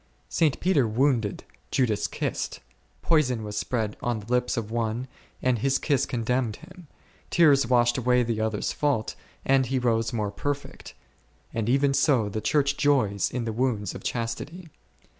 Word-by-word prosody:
St. 155 Hz, -5 st, +1 dB
Peter 165 Hz, -9 st, +2 dB
wounded, 115 Hz, -2 st, +1 dB, 0.3 s
Judas 115 Hz, -6 st, +1 dB
kissed; -, -, -3 dB, 0.4 s
poison 130 Hz, -9 st, +2 dB
was 105 Hz, -1 st, -6 dB
spread 110 Hz, 0 st, -2 dB
on 120 Hz, -2 st, -1 dB
the 105 Hz, -, -11 dB
lips 125 Hz, 0 st, +1 dB
of 110 Hz, -2 st, -3 dB
one, 115 Hz, +2 st, -2 dB, 0.4 s
and 125 Hz, -3 st, +2 dB
his 135 Hz, +4 st, +2 dB
kiss 140 Hz, -4 st, +1 dB
condemned 120 Hz, -1 st, -1 dB
him; 180 Hz, 0 st, -14 dB, 0.4 s
tears 145 Hz, -7 st, +5 dB
washed 120 Hz, 0 st, +3 dB
away 125 Hz, 0 st, +3 dB
the 115 Hz, -2 st, -2 dB
other's 110 Hz, -2 st, -1 dB
fault, 140 Hz, -7 st, 0 dB, 0.3 s
and 135 Hz, -1 st, +3 dB
he 130 Hz, +2 st, 0 dB
rose 115 Hz, -2 st, +1 dB
more 105 Hz, -4 st, -2 dB
perfect: 145 Hz, +6 st, -5 dB, 0.6 s
and 115 Hz, 0 st, -1 dB
even 135 Hz, +2 st, +3 dB
so, 135 Hz, -6 st, +3 dB
the 110 Hz, +2 st, -3 dB
Church 140 Hz, +5 st, +1 dB
joys 120 Hz, -9 st, +2 dB
in 120 Hz, -2 st, -3 dB
the 110 Hz, -, -2 dB
wounds 110 Hz, -5 st, -1 dB
of -, -, -9 dB
chastity 120 Hz, +9 st, -4 dB
<J. 165 Hz, -, -15 dB
125 Hz, 160 wpm, -26 LUFS, 110-140 Hz, 0.6 s, tears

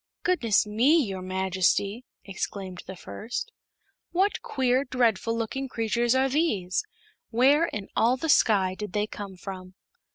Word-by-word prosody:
"Goodness 245 Hz, -, +2 dB
me, 235 Hz, +10 st, +3 dB
your 195 Hz, -4 st, -4 dB
Majesty!" 190 Hz, +4 st, 0 dB, 0.2 s
exclaimed 190 Hz, -1 st, -5 dB
the 190 Hz, -, -7 dB
first; 200 Hz, -, -6 dB, 0.6 s
"what 385 Hz, +4 st, +1 dB
queer, 260 Hz, 0 st, +1 dB
dreadful 230 Hz, -4 st, +1 dB
looking 270 Hz, +4 st, -3 dB
creatures 235 Hz, +1 st, +1 dB
are 265 Hz, +1 st, +3 dB
these? 255 Hz, -, 0 dB, 0.5 s
Where 275 Hz, +7 st, +4 dB
in 205 Hz, -8 st, -5 dB
all 240 Hz, +3 st, +3 dB
the 320 Hz, -, -3 dB
Sky 200 Hz, -10 st, +4 dB
did 210 Hz, 0 st, -7 dB
they 210 Hz, 0 st, +1 dB
come 205 Hz, -2 st, -8 dB
from?" 185 Hz, 0 st, -8 dB
220 Hz, 135 wpm, -26 LUFS, 190-260 Hz, 0.6 s, Where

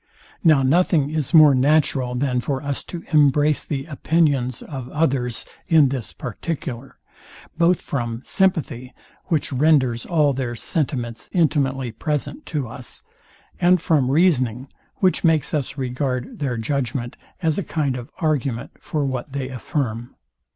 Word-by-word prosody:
Now 155 Hz, -6 st, +5 dB
nothing 150 Hz, 0 st, +3 dB
is 155 Hz, -4 st, -2 dB
more 155 Hz, -4 st, +8 dB
natural 135 Hz, -2 st, +2 dB
than 125 Hz, -1 st, 0 dB
for 135 Hz, +2 st, -2 dB
us 140 Hz, -1 st, -3 dB
to 170 Hz, -2 st, -7 dB
embrace 150 Hz, 0 st, +4 dB
the 135 Hz, -3 st, -3 dB
opinions 140 Hz, -5 st, 0 dB
of 130 Hz, -4 st, -7 dB
others 135 Hz, -7 st, 0 dB, 0.2 s
in 160 Hz, -6 st, +5 dB
this 130 Hz, -5 st, -4 dB
particular; 125 Hz, -, -6 dB, 0.6 s
both 170 Hz, +1 st, +3 dB
from 120 Hz, -3 st, -3 dB
sympathy, 155 Hz, -, 0 dB, 0.3 s
which 155 Hz, -5 st, -1 dB
renders 130 Hz, -4 st, +2 dB
all 150 Hz, -5 st, +3 dB
their 125 Hz, -2 st, -3 dB
sentiments 120 Hz, -4 st, -2 dB
intimately 135 Hz, -7 st, +1 dB
present 150 Hz, -, -3 dB
to 145 Hz, -6 st, -2 dB
us; 120 Hz, 0 st, -7 dB, 0.6 s
and 180 Hz, 0 st, +4 dB
from 150 Hz, -6 st, +2 dB
reasoning, 135 Hz, -6 st, +2 dB, 0.3 s
which 185 Hz, -2 st, +1 dB
makes 160 Hz, -3 st, +2 dB
us 145 Hz, -2 st, -2 dB
regard 130 Hz, -1 st, -3 dB
their 130 Hz, -5 st, -1 dB
judgment, 125 Hz, 0 st, -2 dB, 0.3 s
as 160 Hz, +2 st, +1 dB
a -, -, -2 dB
kind 145 Hz, -7 st, -1 dB
of 125 Hz, -1 st, -7 dB
argument 140 Hz, -8 st, -1 dB
for 150 Hz, -2 st, -2 dB
what 130 Hz, +1 st, -4 dB
they 135 Hz, -2 st, -3 dB
affirm. 125 Hz, -3 st, -3 dB
140 Hz, 135 wpm, -22 LUFS, 125-155 Hz, 0.6 s, more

